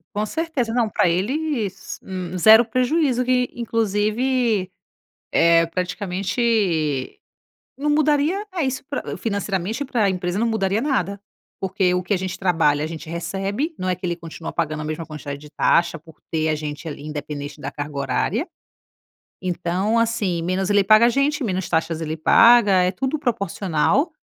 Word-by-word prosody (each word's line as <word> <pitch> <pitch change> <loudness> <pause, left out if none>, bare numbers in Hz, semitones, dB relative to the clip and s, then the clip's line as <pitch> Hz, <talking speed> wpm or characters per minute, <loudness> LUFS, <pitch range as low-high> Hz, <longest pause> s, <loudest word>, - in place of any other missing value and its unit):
Com 210 +1 0
certeza. 285 -4 -2
Não 240 -2 +2
pra 180 - +2
eles, 220 - -2
hum, 185 -1 -5
0 220 +6 +8
prejuízo. 255 +2 +1
Que, 250 0 +1
inclusive, 225 -1 0 0.6
eh, 165 0 +5
praticamente 180 - -1 0.6
não 295 +2 -1
mudaria 300 +5 +2
É 335 - 0
isso: 265 0 -2
pra 285 - -4
financeiramente, 200 +3 -2
para 240 -5 0
a - - +3
empresa, 180 0 -2
não 230 - +1
mudaria 205 -1 0
nada. 200 - -1 0.4
Porque 190 -1 +1
o 180 - 0
que 185 +3 0
a - - +2
gente 185 0 -4
trabalha, 160 -6 +2
a - - -1
gente 160 0 -7
recebe. 195 - -3
Não 185 - -3
é 185 - +1
que 180 +1 -6
ele 170 -1 -1
continua 165 -1 -8
pagando 155 -2 -2
a - - -4
mesma 155 +1 -4
quantidade 150 -2 -7
de 150 +1 -14
taxa 170 +2 +2
por 160 0 -18
ter 160 -1 0
a 155 - +2
gente 150 +1 -5
ali, 145 - -7
independente 145 -1 -6
da 135 - -4
carga 145 0 -6
horária. 180 - -1 0.9
Então, 185 +5 0
assim, 210 -7 0
menos 185 +3 -1
ele 205 -1 +4
paga 215 +4 +6
a - - +4
gente, 275 +3 +1
menos 190 -4 -2
taxas 165 -1 0
ele 160 -1 -3
paga. 200 +3 +6
É 180 - +2
tudo 265 +10 -2
proporcional, 205 - 0
195 Hz, 165 wpm, -22 LUFS, 165-235 Hz, 0.9 s, 0